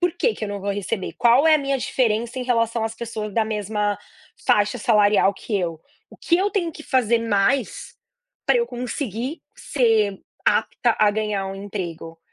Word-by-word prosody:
por 355 Hz, -2 st, +2 dB
que 475 Hz, -, +2 dB
que 220 Hz, -, -5 dB
eu -, -, -4 dB
não 200 Hz, -1 st, -5 dB
vou 200 Hz, +1 st, -2 dB
receber? 200 Hz, 0 st, -3 dB
Qual 245 Hz, +6 st, +5 dB
é 315 Hz, -, +7 dB
a -, -, +4 dB
minha 275 Hz, -1 st, -1 dB
diferença 235 Hz, 0 st, 0 dB
em 255 Hz, -, -2 dB
relação 230 Hz, -2 st, +1 dB
às 225 Hz, 0 st, -3 dB
pessoas 220 Hz, -3 st, -5 dB
da 225 Hz, -1 st, +2 dB
mesma 210 Hz, -1 st, -1 dB, 0.5 s
faixa 210 Hz, +3 st, +3 dB
salarial 210 Hz, -3 st, +4 dB
que 205 Hz, 0 st, -3 dB
eu? 165 Hz, -3 st, -3 dB, 0.3 s
O -, -, -14 dB
que 340 Hz, -, +2 dB
eu 400 Hz, +2 st, +1 dB
tenho 345 Hz, -6 st, -1 dB
que 310 Hz, -, -10 dB
fazer 240 Hz, -5 st, +2 dB
mais 225 Hz, +3 st, 0 dB, 0.5 s
pra -, -, +4 dB
eu 470 Hz, 0 st, +1 dB
conseguir 245 Hz, -, -4 dB, 0.2 s
ser 220 Hz, -7 st, +1 dB, 0.2 s
apta 235 Hz, -2 st, +2 dB
a 210 Hz, -1 st, +5 dB
ganhar 210 Hz, -2 st, -2 dB
um 195 Hz, -, -5 dB
emprego?". 175 Hz, -5 st, -6 dB
220 Hz, 185 wpm, -22 LUFS, 205-250 Hz, 0.5 s, é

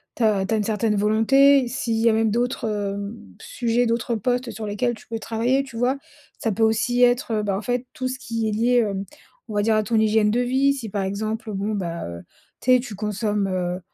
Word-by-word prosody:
tu -, -, -8 dB
as 205 Hz, -3 st, +2 dB
tu 195 Hz, -, -2 dB
as -, -, +2 dB
une 210 Hz, -, 0 dB
certaine 215 Hz, 0 st, 0 dB
volonté, 250 Hz, +6 st, +4 dB
s'il 235 Hz, -1 st, -2 dB
y 225 Hz, +1 st, +2 dB
a 230 Hz, -, +5 dB
même 220 Hz, 0 st, +2 dB
d'autres, 240 Hz, +1 st, -1 dB
hem, 205 Hz, +1 st, -3 dB, 0.2 s
s -, -, -11 dB
sujets, 240 Hz, -, 0 dB
d'autres 235 Hz, +1 st, -1 dB
postes 245 Hz, +3 st, -1 dB
sur 220 Hz, -1 st, -6 dB
lesquels 225 Hz, +4 st, 0 dB
tu 225 Hz, -, -13 dB
peux 225 Hz, -, -4 dB
travailler, 235 Hz, +5 st, 0 dB
tu 265 Hz, -4 st, -10 dB
vois? 250 Hz, +3 st, +1 dB, 0.4 s
Ça 225 Hz, -, -1 dB
peut 220 Hz, +3 st, -3 dB
aussi 225 Hz, +3 st, +2 dB
être, 245 Hz, -2 st, +3 dB
bah, 200 Hz, -2 st, -1 dB
en 200 Hz, -, -4 dB
fait, 245 Hz, +1 st, -2 dB
tout 255 Hz, -, -3 dB
ce 260 Hz, 0 st, -4 dB
qui 230 Hz, -2 st, -2 dB
est -, -, 0 dB
lié, 235 Hz, +4 st, +2 dB
hem, 195 Hz, -1 st, -3 dB, 0.4 s
on 215 Hz, -, -6 dB
va 205 Hz, -, +2 dB
dire 220 Hz, +1 st, +3 dB
à 215 Hz, -, +3 dB
ton 215 Hz, +2 st, -2 dB
hygiène 215 Hz, -1 st, +3 dB
de 235 Hz, +3 st, +1 dB
vie, 265 Hz, +3 st, +2 dB
si 235 Hz, -5 st, -6 dB
par 200 Hz, 0 st, -2 dB
exemple 215 Hz, +3 st, -3 dB
bon 200 Hz, +2 st, -2 dB
bah, 170 Hz, -4 st, -3 dB
heu, 85 Hz, 0 st, -7 dB, 0.4 s
tu 255 Hz, -, +4 dB
sais, -, -, +4 dB
tu 245 Hz, -3 st, -7 dB
consommes, 210 Hz, 0 st, -1 dB
heu, 180 Hz, -1 st, -2 dB
225 Hz, 240 wpm, -23 LUFS, 210-245 Hz, 0.4 s, a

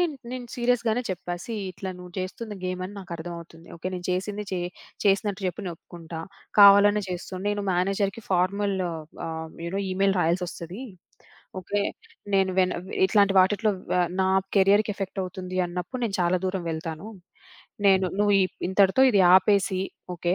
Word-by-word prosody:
నేను 340 Hz, -4 st, +1 dB, 0.2 s
నేను 255 Hz, -1 st, -5 dB
సీరియస్‌గానే 240 Hz, -1 st, +1 dB
చెప్పా 180 Hz, -1 st, -4 dB
సీ 230 Hz, -, -5 dB, 0.2 s
ఇట్లా 190 Hz, +1 st, -6 dB
నువ్వు 180 Hz, 0 st, -11 dB
చేస్తుంది 205 Hz, +4 st, -5 dB
గేమని 185 Hz, +1 st, -3 dB
నాకర్థమవుతుంది. 170 Hz, -2 st, -8 dB
ఓకే. 165 Hz, -, -23 dB
నేను 180 Hz, -1 st, -6 dB
చేసింది 200 Hz, +3 st, -2 dB
చే 185 Hz, -, 0 dB, 0.5 s
చేసినట్టు 200 Hz, 0 st, +1 dB
చెప్పు 180 Hz, +2 st, -4 dB
నేనొప్పుకుంటా, 165 Hz, -1 st, -8 dB, 0.4 s
కావాలనే 205 Hz, +1 st, +8 dB
చేస్తూ 180 Hz, +1 st, -6 dB, 0.2 s
నేను 205 Hz, 0 st, -1 dB
మేనేజర్‌కి 195 Hz, +4 st, 0 dB
ఫార్‌మల్ 195 Hz, +2 st, +1 dB, 0.5 s
ఆహ్, 160 Hz, 0 st, -5 dB
యూ -, -, -3 dB
నో -, -, 0 dB
ఈమెయిల్ 195 Hz, +1 st, +2 dB
రాయాల్సొస్తది. 175 Hz, +4 st, -2 dB, 0.8 s
ఓకే. 200 Hz, +3 st, -1 dB, 0.5 s
నేను 190 Hz, -1 st, +3 dB
వెన్ 185 Hz, -1 st, +3 dB, 0.3 s
ఇట్లాంటి 200 Hz, -1 st, +4 dB
వాటిల్లో 210 Hz, +3 st, +3 dB, 0.2 s
వ -, -, +2 dB, 0.3 s
నా 190 Hz, -, +2 dB, 0.3 s
కెరియర్‌కి 205 Hz, +2 st, +4 dB
ఎఫెక్టవుతుంది 185 Hz, -1 st, -5 dB
అన్నప్పుడు 180 Hz, +8 st, -5 dB
నేను 205 Hz, -4 st, -1 dB
చాలా 175 Hz, +1 st, +3 dB
దూరం 185 Hz, -1 st, -2 dB
వెళ్తాను. 160 Hz, +4 st, -5 dB, 0.8 s
నేను 190 Hz, -1 st, +5 dB
నువ్వు 205 Hz, 0 st, +3 dB, 0.3 s
ఇంతటితో 190 Hz, +6 st, +4 dB
ఇది 205 Hz, -4 st, +4 dB
ఆపేసి 195 Hz, 0 st, +3 dB, 0.3 s
ఓకే, 175 Hz, +1 st, 0 dB
190 Hz, 140 wpm, -26 LUFS, 180-205 Hz, 0.8 s, కావాలనే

